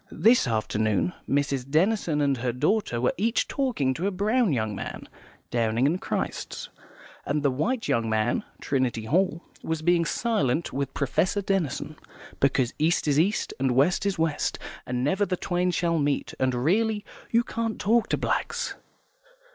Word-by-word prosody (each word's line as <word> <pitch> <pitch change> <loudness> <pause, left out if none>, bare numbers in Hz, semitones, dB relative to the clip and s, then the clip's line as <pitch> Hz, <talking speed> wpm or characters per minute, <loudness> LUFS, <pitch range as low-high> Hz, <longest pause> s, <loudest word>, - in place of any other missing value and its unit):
This 225 - +4
afternoon 110 - 0 0.2
Mrs. 140 -2 0
Denison 165 -1 +2
and 140 -2 +2
her 120 0 -1
daughter 140 - 0
were 125 - +1
each 225 +5 +1
talking 240 - 0
to 170 +8 -2
a - - +2
brown 210 +3 +1
young 110 -5 0
man - - -6 0.4
(Downing 115 +1 +1
and 170 +6 +1
Christ's), - - -3 0.5
and 145 +1 -1
the 140 - +3
white 225 - -1
young 115 -1 +1
man 110 +2 +1 0.2
(Trinity 130 -5 -1
Hall) 170 +5 +1 0.2
was 160 -1 -3
being 175 0 +3
silent 170 - 0
with 140 -1 -3
Professor 185 +9 0
Denison, 190 -9 -1 0.4
because 135 -2 +2
East 160 +1 +2
is 145 0 +3
East 195 +6 +1
and 130 -2 +1
West 145 +9 +3
is 200 - -1
West, 160 -2 0 0.3
and 125 0 -1
never 185 +9 +1
the 185 -2 -1
twain 180 +1 0
shall 170 -1 +1
meet, 145 -1 0
and 130 -1 +1
really, 205 - +1 0.2
you 235 +1 +3
can't 230 -1 -3
talk 225 +3 +2
to - - +1
blacks. - - -1
155 Hz, 160 wpm, -26 LUFS, 130-195 Hz, 0.5 s, This